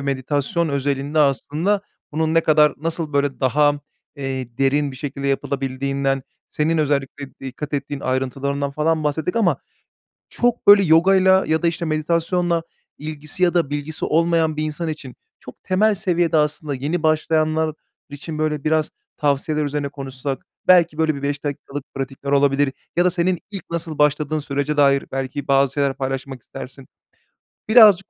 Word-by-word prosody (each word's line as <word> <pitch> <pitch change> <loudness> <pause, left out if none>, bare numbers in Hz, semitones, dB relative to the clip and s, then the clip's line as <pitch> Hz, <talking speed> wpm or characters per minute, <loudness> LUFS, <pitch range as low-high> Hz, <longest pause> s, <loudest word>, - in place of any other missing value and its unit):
meditasyon 140 +4 -1
özelinde 140 +1 -1
aslında 150 - +1 0.3
bunun 160 +1 0
ne 165 - +5
kadar, 150 -2 +4
nasıl 165 0 -3
böyle 140 -1 0
daha, 145 +3 +2 0.4
eee, 130 -3 -5
derin 140 +1 +2
bir 130 - -10
şekilde 140 0 -5
yapılabildiğinden, 135 0 -1 0.3
senin 160 +2 0
özellikle 140 -2 -2
dikkat 135 +3 -6
ettiğin 140 0 -3
ayrıntılarından 135 +2 -2
falan 155 +2 0
bahsettik 155 +7 -1
ama 200 -7 +3 0.7
çok, 245 0 0
böyle, 200 -1 +8
yogayla 190 +3 +5
ya 160 +2 +1
da, - - +2
işte, 170 0 -3
meditasyonla 165 +2 0 0.4
ilgisi 150 +3 -6
ya 180 -1 +4
da 165 -5 +1
bilgisi 145 +2 -4
olmayan 165 -1 +2
bir 155 - -1
insan 155 +2 -3
için 145 -5 -6 0.3
çok 125 - -13
temel 210 +3 +2
seviyede 175 -4 +1
aslında, 150 -1 0
yeni, 150 +6 -2
başlayanlar 155 0 +1 0.4
için, 150 +2 -7
böyle, 150 -2 -1
biraz 155 0 +1 0.3
tavsiyeler 150 +1 0
üzerine 145 0 -2
konuşsak 135 -1 -6 0.2
belki, 170 -4 +5
böyle, 160 -1 +2
bir 140 - -7
5 140 +1 -2
dakikalık 145 -1 -5
pratikler 135 +1 -5
olabilir 140 -1 +3 0.2
ya 175 - +4
da 180 - +4
senin 180 0 0
ilk 195 -4 -6
nasıl 165 -2 -4
başladığın 150 +1 +2
sürece 145 0 -2
dair 140 -1 +4
belki 135 +1 -4
bazı 135 -1 +3
şeyler 140 -2 0
paylaşmak 135 -1 -4
istersin. 130 +3 -10 0.8
Birazcık 210 -5 +7
150 Hz, 150 wpm, -21 LUFS, 140-160 Hz, 0.8 s, böyle